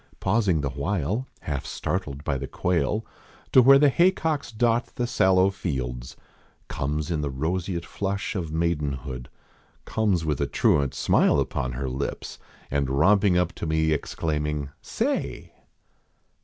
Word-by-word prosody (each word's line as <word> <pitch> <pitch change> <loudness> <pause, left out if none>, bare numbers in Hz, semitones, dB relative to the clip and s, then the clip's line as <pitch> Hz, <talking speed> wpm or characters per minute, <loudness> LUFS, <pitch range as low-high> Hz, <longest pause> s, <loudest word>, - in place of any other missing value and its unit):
Pausing 95 -5 +2
the 70 -1 -2
while, 95 - -2
half 70 -3 -3
startled 75 -7 -3
by 70 -3 -1
the 65 0 -4
quail 90 +5 0 0.2
), - - -27
To 130 - +9
where 135 +2 +8
the 145 0 +5
haycocks 160 -4 +1
dot 115 +1 0
the 120 - -1
sallow 95 -4 +3
fields; 65 -9 -4 0.5
Comes 75 +4 -2
in 80 -3 0
the 75 - -2
roseate 85 +5 -2
flush 100 0 -3
of 85 -6 -3
maidenhood; 70 -6 -2 0.6
Comes 100 -7 0
with 75 -4 -1
a - - +1
truant 70 -2 +2
smile - - +3
upon 60 -2 -2
her 65 +2 -3
lips. 65 +2 -4 0.3
And 70 -1 0
romping 95 +7 +4
up 90 -1 +1
to - - -5
me 80 0 +1
exclaiming: 75 -1 -2
" - - -43 0.2
Say - - -1
80 Hz, 145 wpm, -25 LUFS, 70-100 Hz, 0.6 s, To